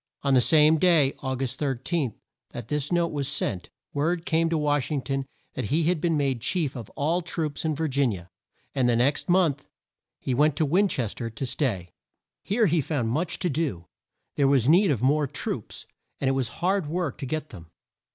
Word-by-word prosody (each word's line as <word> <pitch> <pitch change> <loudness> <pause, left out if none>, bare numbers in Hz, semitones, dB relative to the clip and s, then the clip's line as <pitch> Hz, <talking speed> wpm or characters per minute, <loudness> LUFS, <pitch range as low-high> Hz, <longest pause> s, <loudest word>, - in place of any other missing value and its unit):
On 140 -1 +2
the 130 - +6
same 150 +6 +5
day, 160 -6 +4
Au 130 -1 -2
gust 130 0 -3
13, 135 - -1 0.4
that 120 -2 -7
this 150 +1 -1
note 170 -1 +2
was 140 -3 -2
sent, 120 -10 -1 0.2
word 165 +4 0
came 165 0 +2
to 165 - +1
Wash 145 -2 0
ing 145 -4 -2
ton 135 -1 -2 0.3
that 130 - -3
he 160 +5 +1
had 165 -1 +1
been 165 -3 +1
made 135 -4 0
chief 155 0 -1
of 115 -5 -7
all 165 +5 +1
the 170 - -16
troops 155 -4 -3
in 155 -2 0
Vir 160 +2 -1
gin 135 -4 +1
i - - -3
a, 85 -2 -10 0.5
and 130 -3 +2
the 120 - +3
next 130 +9 +1
month 170 -6 +2 0.5
he 130 - -2
went 150 +3 +3
to 155 - +1
Win 185 +8 +3
ches 120 - -2
ter 115 -2 -5
to 115 +4 -5
stay. 110 - -2 0.5
Here 220 +3 +1
he 170 -3 +2
found 130 -5 -1
much 160 +9 -1
to 180 - -1
do. 135 - -2 0.5
There 140 - +4
was 135 -3 +3
need 180 +6 +5
of 125 -5 0
more 145 +2 +3
troops, - - -5 0.3
and 135 - -1
it 135 - +3
was 130 -3 0
hard 190 -2 +1
work 165 -3 -2
to 135 - -4
get 155 +2 -3
them. 85 -8 -12
145 Hz, 215 wpm, -26 LUFS, 130-160 Hz, 0.5 s, the